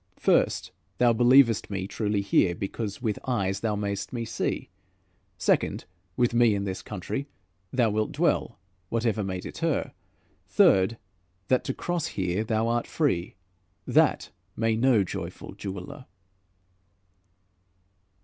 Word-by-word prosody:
First, - - +2 0.3
thou 120 -1 +4
believest 120 -1 +5
me 95 -2 -3
truly 105 0 -1
here, 95 -3 +2
Because 100 +4 -5
with 110 -3 -1
eyes 100 -6 0
thou 110 -1 -1
mayst 100 -1 -3
me 115 -2 -3
see; 115 - -3 0.7
Second, - - +1 0.3
with 120 -1 +2
me 120 -3 +4
in 100 - -2
this 95 -1 -4
country 110 +8 -5 0.4
Thou 120 -4 +2
wilt 110 +1 0
dwell, - - 0 0.3
whatever 115 -2 0
may 95 -1 -3
deter; - - -2 0.6
Third, 95 +4 +4 0.5
that 130 - +3
to - - -2
cross 175 -3 -2
here 95 +2 0
thou 110 0 0
art 120 0 0
free: 95 - 0 0.5
That - - +2 0.2
may 115 -1 +1
no 115 -3 +4
joyful 90 - -6
jeweler." 100 +7 -7
110 Hz, 125 wpm, -27 LUFS, 100-120 Hz, 0.7 s, believest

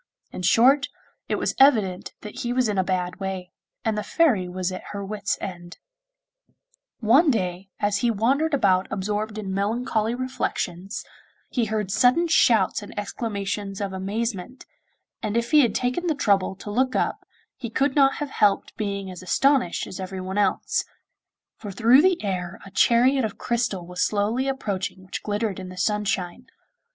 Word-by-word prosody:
In - - -6
short, 260 +10 +4 0.4
it - - +1
was - - -1
evident 215 -10 +3
that 210 - -8
he 240 0 -2
was 250 -1 +2
in 205 -2 0
a - - +3
bad 180 -2 -2
way, 190 -2 -4 0.3
and 220 -1 +1
the 210 - -1
Fairy 220 - +2
was 185 0 -2
at 185 - -5
her 200 -1 -4
wits' 205 0 -2
end. 175 -2 -7 1.2
One 265 +9 +5
day, 185 -5 -1
as 205 0 +1
he 240 +3 +1
wandered 270 +8 +1
about 190 -7 +2
absorbed 210 +2 -3
in 195 -3 -4
melancholy 220 +2 0
reflections, 215 -7 -3 0.5
he 240 -3 +1
heard 210 -3 -2
sudden 255 - +4
shouts 225 - +3
and 205 - -11
exclamations 200 -2 -3
of 200 -2 -3
amazement, 205 +4 -4 0.6
and 215 +2 -1
if 235 0 -1
he 305 - +7
had 235 -6 +1
taken 255 +8 -1
the 315 - +1
trouble 200 -7 +1
to 205 +2 -8
look 255 +4 +1
up - - -1 0.3
he 235 - -6
could 265 +4 0
not 275 -2 +5
have 295 -2 -4
helped 205 -2 +1
being 200 -3 -3
as 180 - -9
astonished 250 +1 +2
as 190 - -8
everyone 190 +1 -4
else, 205 - +1 0.7
for 210 - -8
through 235 +7 +5
the 365 -4 +2
air 185 0 -3
a 195 - -11
chariot 250 +5 +4
of 220 - -3
crystal 230 -7 -1
was 180 +1 -5
slowly 215 +6 +1
approaching 195 -8 -3
which 185 - -5
glittered 210 -1 -2
in 185 -1 -7
the 185 - -10
sunshine. 205 +2 -1
210 Hz, 165 wpm, -24 LUFS, 190-245 Hz, 1.2 s, he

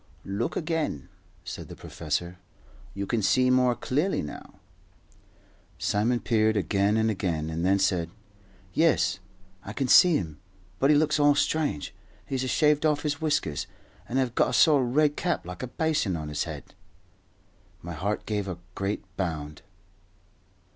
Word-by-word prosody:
"Look 100 +5 -2
again," 155 - -2 0.4
said - - -7
the - - -9
professor. 90 +1 -4 0.6
"You 100 0 -3
can 115 +2 0
see 125 +6 +3
more 125 -1 +3
clearly 150 - 0
now." 75 - -9 1.2
Simon 115 +4 0
peered 110 -2 +2
again 100 +3 +1
and 110 0 +2
again, 80 -6 -2
and 80 +1 -3
then 95 +2 +3
said, 90 -3 +1 0.6
"Yes, 95 - +2 0.4
I 100 - -7
can 135 +2 -1
see 175 +4 +7
him; 80 -5 -6 0.4
but 135 - +3
he 150 - +6
looks 150 0 +2
all 145 0 +5
strange. 145 - 0 0.3
He's 130 -1 -2
a - - -2
shaved 150 +2 +3
off 150 -2 +1
his 150 0 -2
whiskers, 150 - -1 0.4
and 125 - -1
hev 130 -3 +1
got - - +2
a - - -4
sort 150 -5 +5
o' - - +1
red 145 +4 +2
cap, 175 - -1
like 90 0 -7
a 130 - -3
baisin, 150 - 0
on 75 -1 -5
his 75 -1 -2
head." - - -8 1.1
My 85 +1 -6
heart 100 +7 -2
gave 105 -2 -2
a 90 -3 -4 0.2
great 100 +2 -3
bound. 80 -5 -4
110 Hz, 160 wpm, -27 LUFS, 90-145 Hz, 1.2 s, see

